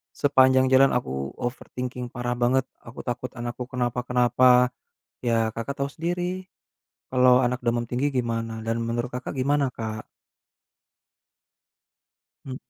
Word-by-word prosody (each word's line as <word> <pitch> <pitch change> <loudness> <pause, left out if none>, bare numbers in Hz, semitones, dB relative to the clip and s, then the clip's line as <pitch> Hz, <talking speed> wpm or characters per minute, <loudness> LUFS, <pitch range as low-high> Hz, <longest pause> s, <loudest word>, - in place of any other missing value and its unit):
Sepanjang 130 -2 +4
jalan 135 +1 +7
aku 70 - -3
overthinking 125 0 -5
parah 120 -1 -2
banget, 125 +2 +2 0.2
aku 115 0 -12
takut 125 +1 -3
anakku 120 +1 -4
kenapa-kenapa. 125 0 +3 0.5
Ya, 115 -2 +1
Kakak 125 +5 -4
tau 140 0 -1
sendiri, 180 +3 -3 0.6
kalau 125 0 +5
anak 125 +1 -1
demam 120 0 +1
tinggi 130 +4 0
gimana, 115 -2 -2
dan 115 +1 0
menurut 120 +1 -2
Kakak 125 +3 -5
gimana 140 +1 +2
Kak? 110 -1 -5 2.4
Mmm. 130 -2 -6
125 Hz, 120 wpm, -25 LUFS, 120-130 Hz, 2.4 s, jalan